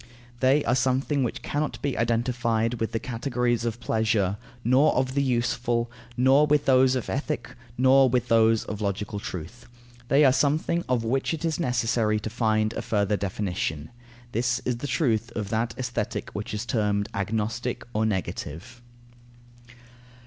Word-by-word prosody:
They 135 +3 +3
are 120 - +2
something 130 +2 +1
which 120 - -3
cannot 150 +1 -2
be 140 -3 0
identified 115 0 0
with 115 - -1
the 115 - -1
categories 120 -1 -1
of 115 0 -2
pleasure, 110 -4 0 0.3
nor 130 +6 +4
of 130 0 0
the 140 - +1
useful, 120 -2 0 0.3
nor 135 +4 +5
with 150 -1 +2
those 130 0 +4
of 125 - -3
ethic, 145 -2 -3 0.3
nor 130 +1 +5
with 125 0 0
those 115 -1 +4
of 105 0 -5
logical 100 0 -2
truth. 95 +6 -7 0.4
They 140 +3 +5
are 130 - +6
something 155 +5 +1
of 125 -3 +1
which 135 +7 0
it 160 +1 -5
is 160 0 -1
necessary 115 -6 +1
to 110 - -5
find 110 -2 +1
a - - -3
further 105 -1 0
definition. 95 -6 -3 0.4
This 120 +2 +1
is 125 -2 0
the 145 - -5
truth 120 -3 0
of 105 -3 -3
that 115 +1 -1
Aesthetic 125 -2 -3
which - - -5
is 105 +3 -3
termed 105 -3 0
agnostic 110 +5 -2
or 110 - +1
negative. 105 +2 -4
120 Hz, 155 wpm, -26 LUFS, 110-130 Hz, 0.4 s, are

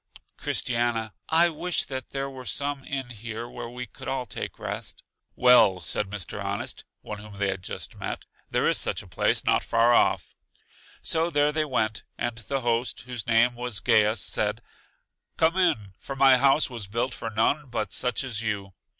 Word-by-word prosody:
Christiana: 115 -2 -1 0.2
I 170 +2 +5
wish 175 +2 -1
that 130 -2 -5
there 135 0 -2
were 130 -2 -8
some 140 -1 -2
inn 135 -3 -4
here 115 +1 -6
where 120 -1 -7
we 125 +1 -6
could 105 - -11
all 130 -2 -1
take 110 - -5
rest. - - -6
I - - -57 0.2
Well, 125 -7 +6
said 95 +5 -1
Mr. 100 0 -4
Honest 100 +1 -3 0.2
one 105 -1 -6
whom 105 -1 -11
they 100 0 +1
had 95 -1 -3
just - - -5
met - - -5 0.2
there - - +2
is - - +3
such - - -1
a - - -15
place - - +1
not - - +3
far 115 +1 +4
off. - - +3 0.7
So 165 +1 +2
there 145 -2 +3
they 155 0 +1
went, 110 -6 0 0.2
and 120 -1 -2
the 135 +4 -2
host, 120 0 0
whose 120 -3 -6
name 120 +1 +4
was 120 -3 -2
Gaius, 105 +1 +4
said: - - -1 0.7
Come 165 +2 +3
in, 155 - +1
for 135 - -6
my 135 -1 +7
house 140 +3 +4
was 115 -6 -6
built 120 +5 -1
for 115 - -4
none 125 +7 +1
but 105 -5 -2
such 125 +1 0
as 115 -5 -2
you. 100 -3 -3
120 Hz, 185 wpm, -26 LUFS, 110-135 Hz, 0.7 s, my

